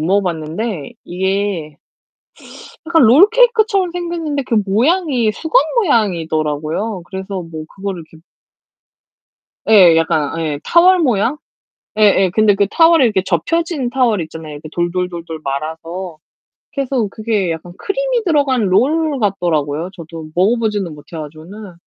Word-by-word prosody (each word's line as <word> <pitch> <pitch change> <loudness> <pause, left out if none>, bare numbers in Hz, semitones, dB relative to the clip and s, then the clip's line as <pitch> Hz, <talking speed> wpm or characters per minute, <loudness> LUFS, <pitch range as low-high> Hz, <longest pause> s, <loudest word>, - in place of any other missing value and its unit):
먹어봤는데 175 0 -2
이게 190 -4 -2 1.1
약간 325 -4 +4
롤케이크처럼 420 - +4
생겼는데 335 -5 -3
그 240 - -2
모양이 250 - +1
수건 320 +6 +2 0.2
모양이더라고요. 170 - -1
그래서 190 0 -5
뭐 160 -2 -8
그거를 195 -3 -5
이렇게 160 0 -19 1.5
예. 185 -6 +7
약간 165 -1 0
예 150 -3 -3
타월 360 +2 +5
모양? 245 -1 +1 0.6
예 - - +2
예. 195 -3 +4
근데 215 +2 +3
그 200 0 +1
타월이 325 +2 +5
이렇게 210 -5 +1
접혀진 270 - -1
타월 245 -7 +1
있잖아요, 160 -1 -9
이렇게 150 +1 -9
돌돌돌돌 175 -2 -3
말아서. 160 +5 -5 0.6
그래서 265 -6 -1
그게 215 -4 -1
약간 165 +2 -6
크림이 - - -1
들어간 280 - +1
롤 290 - +1
같더라고요. 170 - -1
저도 165 -2 -9
먹어보지는 205 -3 0
못 145 - -14
해 - - -6
가지고는. 165 +7 -10
200 Hz, 305 characters per minute, -17 LUFS, 165-270 Hz, 1.5 s, 예